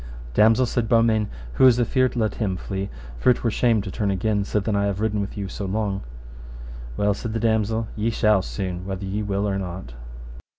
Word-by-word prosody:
Damosel, 110 - +5
said 120 -2 -1
Beaumains, 115 -2 +3 0.3
who 130 - +6
is 125 -1 +5
afeard 130 +2 +2
let 110 -3 0
him 95 -5 -2
flee, 95 +1 -4 0.3
for - - +3
it 125 - +2
were 115 - +2
shame 115 -2 +2
to 95 - -5
turn 105 -1 -1
again 100 +2 0
sithen 105 +1 -1
I 100 0 +2
have 100 -1 -1
ridden 105 -1 0 0.3
so 100 - -5
long 100 +1 -1
with 95 - -4
you. - - -13
Well, 105 0 +2
said 110 +2 -5
the 115 - -1
damosel, 110 0 +1
ye 110 +2 0
shall 110 -3 +3
soon, 90 +7 -4
whether 95 0 -4
ye 100 +2 -2
will 100 0 -1
or 100 -1 -1
not. 90 -9 -6
105 Hz, 205 wpm, -23 LUFS, 95-110 Hz, 0.3 s, who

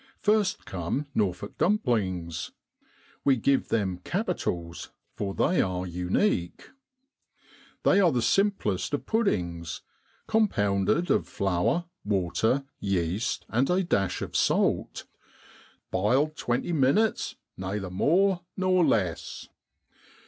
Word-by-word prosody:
First 210 -2 +1
come 95 - -3
Norfolk 95 -5 -2
Dumplings. 100 - 0 0.7
We 140 -2 +4
give 135 +3 +1
them 95 -5 -1
capitals, 85 -1 -3 0.2
for 100 -1 -4
they 180 - +2
are 90 -1 -2
unique. 90 - -1 1.1
They 195 - +5
are 180 -4 +5
the 120 -4 0
simplest 195 - +1
of - - -6
puddings, 85 - -1 0.4
compounded 150 - +1
of - - +2
flour, 95 - 0 0.2
water, 105 +6 +1 0.2
yeast, 95 +3 -1
and 120 +5 +1
a 185 +2 +2
dash 100 - 0
of - - -7
salt, - - +1 0.4
' - - -26
biled 130 +11 +2
twenty 125 +8 -1
minnets 155 +10 +2 0.2
nayther 95 0 -4
more 180 - +2 0.2
nor 185 -1 +3
less.' 95 - -1
110 Hz, 105 wpm, -27 LUFS, -, 1.1 s, They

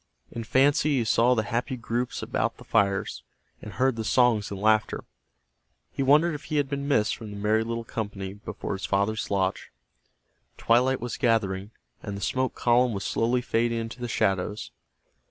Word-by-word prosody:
In 115 - -5
fancy 140 +4 +3
he 120 - +2
saw 120 +2 +3
the 110 - +1
happy 120 +5 -2
groups 120 +1 -3
about - - -1
the - - -13
fires, 100 -1 0 0.4
and - - -9
heard 130 -2 +1
the 110 - -2
songs 115 -2 +3
and 100 - -6
laughter. 110 +1 +2 0.9
He - - -4
wondered 150 +5 +4
if 150 0 -7
he 155 - -4
had 145 -1 +2
been 140 0 -3
missed 110 -7 +2
from 110 - -9
the 105 - -8
merry 105 +2 +2
little 115 0 -3
company 100 -4 -5
before 100 0 -6
his 95 - -4
father's 100 +3 0
lodge. 95 -1 -1 0.9
Twilight 125 +2 +2
was 120 0 -4
gathering, 105 -5 +1 0.3
and 100 -2 -5
the - - -8
smoke 130 +5 -1
column 120 0 +3
was 100 - -4
slowly 120 +2 +1
fading 115 -1 0
into 115 +2 -5
the 120 - -2
shadows. 95 -1 -1
115 Hz, 175 wpm, -26 LUFS, 105-125 Hz, 0.9 s, wondered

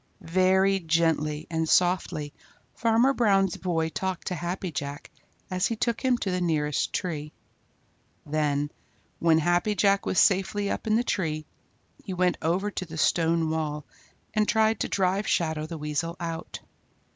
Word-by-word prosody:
Very 190 +1 +4
gently 160 -2 0
and 160 -1 -1
softly 175 -5 +1 0.4
Farmer 230 +4 +3
Brown's 195 -7 +2
boy 165 -3 -1
talked 190 +2 -3
to - - -2
Happy 175 +1 -3
Jack 140 -1 -5 0.4
as 185 +1 +1
he 230 - -2
took 235 +2 -1
him 255 -2 +3
to 195 - -2
the 180 0 -1
nearest 150 -4 0
tree. 150 -5 -3 0.9
Then, 145 -1 0 0.5
when 165 -1 +4
Happy 175 +6 +1
Jack 200 0 +2
was - - -1
safely 200 +1 +2
up - - -4
in 215 - +3
the 235 - +2
tree, 155 -9 -2 0.6
he 190 -3 -5
went 180 0 +1
over 185 +6 0
to 185 - -4
the 160 0 -8
stone 165 0 +2
wall 150 -2 -2 0.5
and 215 -1 +2
tried 220 -1 +2
to - - -1
drive 195 +1 +1
Shadow 160 -2 0
the 165 0 -6
Weasel 150 +3 -2
out. 165 -1 -5
175 Hz, 155 wpm, -27 LUFS, 160-195 Hz, 0.9 s, Very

